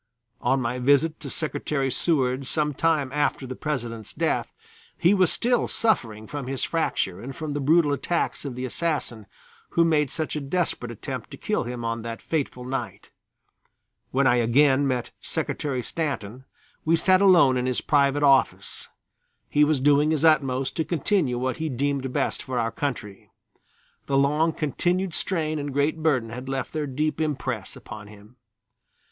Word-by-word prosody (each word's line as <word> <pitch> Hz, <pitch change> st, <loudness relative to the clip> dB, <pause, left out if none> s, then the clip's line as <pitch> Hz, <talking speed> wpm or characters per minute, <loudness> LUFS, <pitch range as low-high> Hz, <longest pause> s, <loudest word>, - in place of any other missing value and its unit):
On 135 Hz, -, +2 dB
my 125 Hz, 0 st, -2 dB
visit 145 Hz, +5 st, +3 dB
to 140 Hz, -, -7 dB
Secretary 145 Hz, -2 st, -2 dB
Seward 130 Hz, -4 st, +1 dB
some 150 Hz, 0 st, 0 dB
time 150 Hz, -3 st, +1 dB
after 145 Hz, -1 st, 0 dB
the 130 Hz, 0 st, -6 dB
President's 120 Hz, -8 st, -4 dB
death, -, -, 0 dB, 0.5 s
he 175 Hz, +4 st, +4 dB
was 185 Hz, -4 st, +4 dB
still 245 Hz, 0 st, +1 dB
suffering 115 Hz, -, 0 dB
from 140 Hz, +1 st, -6 dB
his 135 Hz, 0 st, -2 dB
fracture 100 Hz, -, -1 dB
and 135 Hz, +3 st, -7 dB
from 155 Hz, -3 st, -4 dB
the 145 Hz, -, -2 dB
brutal 150 Hz, +1 st, +3 dB
attacks 170 Hz, +4 st, -1 dB
of 135 Hz, -4 st, -5 dB
the 125 Hz, +1 st, -4 dB
assassin, 130 Hz, -7 st, -2 dB, 0.5 s
who 170 Hz, -, +6 dB
made 150 Hz, -4 st, +2 dB
such 155 Hz, +3 st, -3 dB
a 150 Hz, -, -2 dB
desperate 140 Hz, -4 st, -2 dB
attempt 120 Hz, -, -6 dB
to -, -, -9 dB
kill -, -, -1 dB
him 120 Hz, -1 st, -5 dB
on 115 Hz, 0 st, -2 dB
that 115 Hz, 0 st, -6 dB
fatal 135 Hz, -5 st, -3 dB
night. 135 Hz, +1 st, -5 dB, 1.0 s
When 135 Hz, +1 st, +1 dB
I 125 Hz, -1 st, +4 dB
again 135 Hz, +4 st, +4 dB
met 125 Hz, -2 st, -2 dB
Secretary 130 Hz, -4 st, -2 dB
Stanton 130 Hz, -6 st, -4 dB, 0.4 s
we 165 Hz, +1 st, +3 dB
sat 185 Hz, +2 st, +4 dB
alone 170 Hz, -9 st, +6 dB
in 125 Hz, 0 st, 0 dB
his 130 Hz, -, 0 dB
private 145 Hz, 0 st, +2 dB
office. 135 Hz, -2 st, +2 dB, 0.6 s
He 150 Hz, -, +4 dB
was 150 Hz, -2 st, +2 dB
doing 145 Hz, +2 st, +4 dB
his 155 Hz, 0 st, +1 dB
utmost 135 Hz, -4 st, +2 dB
to 160 Hz, -, +2 dB
continue 160 Hz, -5 st, 0 dB
what 130 Hz, +1 st, -2 dB
he 160 Hz, -1 st, -2 dB
deemed 135 Hz, 0 st, -1 dB
best -, -, -1 dB
for 130 Hz, -2 st, -4 dB
our 115 Hz, -1 st, 0 dB
country. 115 Hz, -6 st, -5 dB, 0.8 s
The 135 Hz, -, +2 dB
long 150 Hz, +4 st, +3 dB
continued 175 Hz, +5 st, -1 dB
strain 155 Hz, -4 st, -1 dB
and 145 Hz, 0 st, -4 dB
great 145 Hz, +4 st, 0 dB
burden 135 Hz, -8 st, +1 dB
had 125 Hz, +3 st, -7 dB
left 135 Hz, 0 st, -3 dB
their 155 Hz, -2 st, -2 dB
deep 150 Hz, +4 st, -1 dB
impress 130 Hz, -9 st, -3 dB
upon 105 Hz, -1 st, -10 dB
him. 105 Hz, +3 st, -16 dB
140 Hz, 165 wpm, -25 LUFS, 125-155 Hz, 1.0 s, who